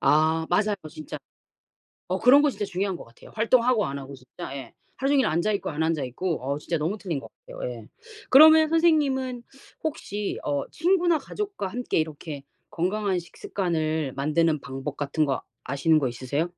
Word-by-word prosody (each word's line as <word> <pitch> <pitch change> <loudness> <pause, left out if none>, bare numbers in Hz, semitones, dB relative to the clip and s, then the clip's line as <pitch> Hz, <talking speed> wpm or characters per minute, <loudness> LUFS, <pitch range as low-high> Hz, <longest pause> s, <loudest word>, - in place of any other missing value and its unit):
아 160 +1 +3
맞아요, 205 +4 +2 0.2
진짜. 155 -1 -7 0.9
어 185 +1 -1
그런 270 +4 +7
거 295 - +4
진짜 205 -4 -3
중요한 190 0 -2
것 - - -9
같아요. 115 - -17
활동하고 230 -1 +3
안 140 - -4
하고 135 0 -9
진짜. 130 +1 -9
예. 130 -4 -8 0.2
하루 270 +1 0
종일 275 -2 +4
앉아있고 185 +6 0
안 150 +2 -1
앉아있고 160 +2 -1
어 140 +2 -1
진짜 165 - -2
너무 165 +8 -1
틀린 175 -8 -3
것 - - -12 0.2
같아요. - - -5
예. - - -10 0.4
그러면 315 +3 +8
선생님은 280 -7 +2 0.4
혹시 210 -10 -3
어 145 -1 -1
친구나 345 -1 +2
가족과 395 - -4
함께 240 -2 -1
이렇게 155 -2 -4 0.3
건강한 190 +2 0
식습관을 160 -5 -2
만드는 155 +2 +1
방법 135 +1 -6
같은 145 +2 0
거 135 -3 -1 0.2
아시는 155 +4 +2
거 135 - 0
있으세요? 130 +6 -2
175 Hz, 355 characters per minute, -26 LUFS, 150-250 Hz, 0.9 s, 그러면